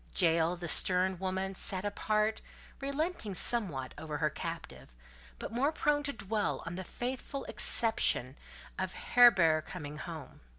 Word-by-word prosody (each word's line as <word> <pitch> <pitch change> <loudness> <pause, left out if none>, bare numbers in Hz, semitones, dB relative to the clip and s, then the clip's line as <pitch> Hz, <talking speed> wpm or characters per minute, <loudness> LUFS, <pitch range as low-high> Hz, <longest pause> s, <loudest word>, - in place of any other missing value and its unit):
Jael, 165 -1 +2
the 170 0 -7
stern 185 +2 +4
woman; 190 0 -3
sat 190 +1 0
apart, 215 +1 -1 0.4
relenting 280 - -4
somewhat 175 - +3
over 155 -1 -5
her 155 -1 -1
captive; - - -8 0.4
but - - -7
more 265 +6 0
prone 295 -2 0
to 285 -1 -2
dwell 215 -4 -2
on 165 - -6
the 190 +2 -6
faithful 260 +7 -6
expectation 220 - +2 0.4
of 190 0 -3
Heber 180 -11 +4
coming 150 -3 -9
home. 160 -5 -9
190 Hz, 135 wpm, -31 LUFS, 165-235 Hz, 0.4 s, stern